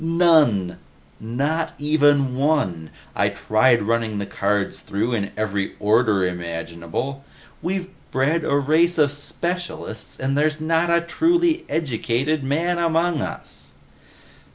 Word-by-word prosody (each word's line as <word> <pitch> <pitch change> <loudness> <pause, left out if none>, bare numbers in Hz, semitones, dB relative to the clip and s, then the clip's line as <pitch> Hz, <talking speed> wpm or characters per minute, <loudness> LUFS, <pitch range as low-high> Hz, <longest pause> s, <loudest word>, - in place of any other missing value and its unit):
"None! 160 - +3 0.4
Not 140 +9 -2
even 145 -3 +3
one! 130 - 0 0.3
I - - +2
tried 115 +2 +2
running 115 -1 0
the 100 - -3
cards 100 0 -1
through 110 +5 -2
in 100 -3 -2
every 100 -2 -2
order 105 -2 +3
imaginable. 85 - -4 0.4
We've 185 0 -2 0.2
bred 150 +5 +1
a 140 - +1
race 160 +5 +2
of 145 -3 +3
specialists 155 -4 -4
and 135 +1 -1
there's 155 +1 +1
not 165 +2 +1
a 170 0 +3
truly 335 - +1
educated 140 0 -1
man 165 +6 0
among 165 -1 +1
us!" - - -7
140 Hz, 120 wpm, -22 LUFS, 110-165 Hz, 0.4 s, None